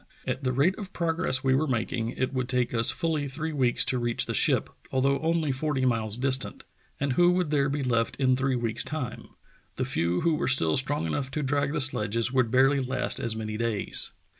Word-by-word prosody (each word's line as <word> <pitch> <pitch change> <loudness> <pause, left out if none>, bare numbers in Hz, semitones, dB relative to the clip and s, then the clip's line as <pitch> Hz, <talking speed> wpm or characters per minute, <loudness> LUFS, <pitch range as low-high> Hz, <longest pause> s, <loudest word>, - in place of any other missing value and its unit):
At 135 - -3
the 130 - +1
rate 145 +9 +2
of 200 -2 -8
progress 165 -5 -1
we 130 -1 +3
were 150 +4 +1
making, 115 -2 -1
it 130 +1 -1
would 130 -1 -2
take 125 -1 0
us 115 -1 +3
fully 160 -4 0
three 155 +4 -4
weeks 130 -4 +2
to 130 - 0
reach 120 -1 0
the - - -4
ship, - - +3 0.2
although 135 +1 +1
only 160 -2 0
forty 135 0 -1
miles 115 -3 0
distant; 130 +1 0 0.4
and 140 -2 0
who 175 +5 +4
would 180 -4 0
there 140 -2 +2
be 140 0 -2
left 115 -3 0
in 130 -2 +2
three 135 0 0
v.eeks' 115 -2 0
time.'' 155 -5 -5 0.5
The - - -2
few 85 +2 0
who 165 -1 +2
were - - -1
still 80 -12 +3
strong 135 - +1
enough 130 - -2
to 150 +2 -3
drag 140 +1 0
the 150 - 0
sledges 115 -2 +1
would 130 -3 +2
barely 135 +4 +4
last 130 -1 -1
as 115 -1 -1
many 110 -1 -4
days!" 115 -3 -2
130 Hz, 215 wpm, -27 LUFS, 120-145 Hz, 0.5 s, who